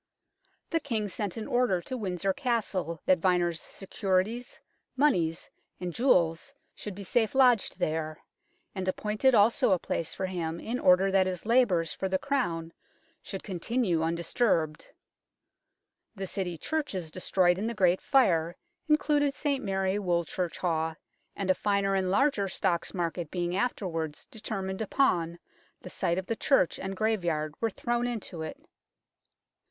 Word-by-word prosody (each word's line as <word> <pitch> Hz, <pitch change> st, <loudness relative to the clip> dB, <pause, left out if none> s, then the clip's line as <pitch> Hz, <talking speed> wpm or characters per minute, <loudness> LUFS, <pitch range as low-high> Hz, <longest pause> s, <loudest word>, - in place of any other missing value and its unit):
The 330 Hz, -, +2 dB
King 225 Hz, -8 st, -2 dB
sent 200 Hz, 0 st, -3 dB
an 220 Hz, -, -4 dB
order 245 Hz, -7 st, +2 dB
to 260 Hz, -, -4 dB
Windsor 195 Hz, -4 st, -1 dB
Castle 205 Hz, -, -1 dB
that 185 Hz, -1 st, +4 dB
Vyner's 175 Hz, -3 st, +2 dB
securities, 195 Hz, +4 st, -2 dB, 0.4 s
moneys 175 Hz, -, +1 dB, 0.3 s
and 180 Hz, -1 st, -4 dB
jewels 180 Hz, -, +2 dB, 0.2 s
should 205 Hz, -3 st, -7 dB
be 200 Hz, -, -7 dB
safe 220 Hz, +5 st, +1 dB
lodged 250 Hz, -5 st, +4 dB
there, 155 Hz, 0 st, -2 dB, 0.6 s
and 190 Hz, -2 st, -4 dB
appointed 215 Hz, +7 st, +2 dB
also 205 Hz, -1 st, +4 dB
a -, -, +3 dB
place 165 Hz, -1 st, -3 dB
for 190 Hz, -, -2 dB
Mm 170 Hz, -3 st, -3 dB
in 245 Hz, +3 st, -3 dB
order 185 Hz, +2 st, +5 dB
that 190 Hz, -1 st, +4 dB
his 185 Hz, 0 st, -4 dB
labours 200 Hz, -10 st, +3 dB
for 190 Hz, -, -3 dB
the 190 Hz, -, +2 dB
Crown 170 Hz, -12 st, -2 dB, 0.5 s
should 195 Hz, -, -6 dB
continue 190 Hz, -1 st, 0 dB
undisturbed. 165 Hz, -1 st, 0 dB, 1.3 s
The 195 Hz, -1 st, -4 dB
City 180 Hz, -2 st, -3 dB
churches 195 Hz, -, -3 dB
de 185 Hz, -, -7 dB
stroyed 180 Hz, -1 st, +3 dB
in 215 Hz, -, -1 dB
the 235 Hz, -, -3 dB
Great 185 Hz, -3 st, +3 dB
Fire 175 Hz, -, +3 dB, 0.3 s
included 290 Hz, -2 st, +3 dB
St 280 Hz, -3 st, -1 dB
Mary 195 Hz, 0 st, 0 dB
Woolchurchhawe, 170 Hz, -2 st, -1 dB, 0.4 s
and 195 Hz, -2 st, +1 dB
a -, -, +5 dB
finer 200 Hz, 0 st, +1 dB
and 190 Hz, -1 st, +1 dB
larger 205 Hz, -1 st, +2 dB
Stocks 180 Hz, -2 st, -1 dB
Market 170 Hz, -2 st, -2 dB
being 175 Hz, 0 st, -2 dB
afterwards 175 Hz, -8 st, -2 dB
determined 195 Hz, -3 st, -4 dB
upon, 175 Hz, -8 st, +1 dB, 0.5 s
the 180 Hz, -, -8 dB
site 170 Hz, +1 st, 0 dB
of 190 Hz, -, -2 dB
the 230 Hz, -, -2 dB
church 220 Hz, -, +2 dB
and 190 Hz, 0 st, -5 dB
graveyard 175 Hz, -9 st, 0 dB
were 225 Hz, -, +2 dB
thrown 240 Hz, +3 st, -1 dB
into 215 Hz, -8 st, -5 dB
it. 160 Hz, -, -5 dB
190 Hz, 145 wpm, -29 LUFS, 175-225 Hz, 1.3 s, order